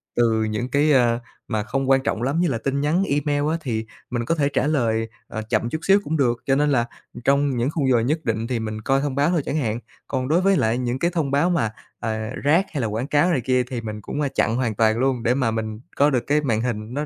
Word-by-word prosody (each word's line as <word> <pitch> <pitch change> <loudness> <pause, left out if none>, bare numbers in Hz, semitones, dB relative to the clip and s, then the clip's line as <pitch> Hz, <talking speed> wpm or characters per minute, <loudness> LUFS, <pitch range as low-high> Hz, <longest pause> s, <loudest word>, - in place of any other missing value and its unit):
từ 115 -2 +2
những 110 +3 -2
cái, 145 +2 +3
ơ, 120 -4 +3 0.3
mà 110 -3 -1
không 135 +3 -2
quan 135 0 +4
trọng 115 - -1
lắm 140 +6 0
như 175 - +3
là 125 -7 0
tin 140 +3 -1
nhắn 165 +6 +2
email 145 -2 0
á, 165 - 0
thì 110 -5 -2 0.2
mình 120 -1 -2
có 165 - +1
thể 145 -2 +1
trả 135 - +1
lời, 115 -7 +1 0.2
ờ, 110 - -5
chậm 115 0 +1
chút 155 - -3
xíu 195 +1 +6
cũng 160 +2 -1
được, 120 -4 +2
cho 135 -1 +3
nên 150 +1 +2
là, 120 -4 +2 0.3
ừm, 120 - -9
trong 140 -2 +2
những 120 +3 +1
khung 140 -5 0
giờ 120 - +4
nhất 155 +7 -1
định 115 0 -1
thì 120 -2 -1
mình 110 -1 -4
coi 135 +4 +1
thông 145 -2 -2
báo 145 +3 +2
thôi 175 -3 +1
chẳng 155 - -1
hạn. 115 -4 -1 0.3
Còn 130 -1 -2
đối 165 +4 +3
với 195 -1 +3
lại 110 +2 +1
những 125 +1 -2
cái 170 +1 +1
thông 155 -5 -1
báo 145 +6 +3
mà, 115 -11 +1 0.3
à, 110 -1 -3
rác 165 +7 +4
hay 140 - -1
là 115 - 0
quảng 115 +6 -3
cáo 150 +5 +3
này 135 - +1
kia 125 +1 +2
thì 125 -1 -5
mình 105 -1 -6
cũng, 145 - -4
a, 145 - +1
chặn 115 -3 0
hoàn 120 -4 -1
toàn 110 +1 +3
luôn, 125 -1 0
để 120 - +3
mà 130 -4 +1
mình 110 -1 -3 0.2
có 145 +1 +4
được 125 -4 0
cái 150 +1 +3
màn 115 -6 0
hình 115 -1 -3
nó 145 +2 -2
130 Hz, 280 wpm, -23 LUFS, 115-145 Hz, 0.3 s, xíu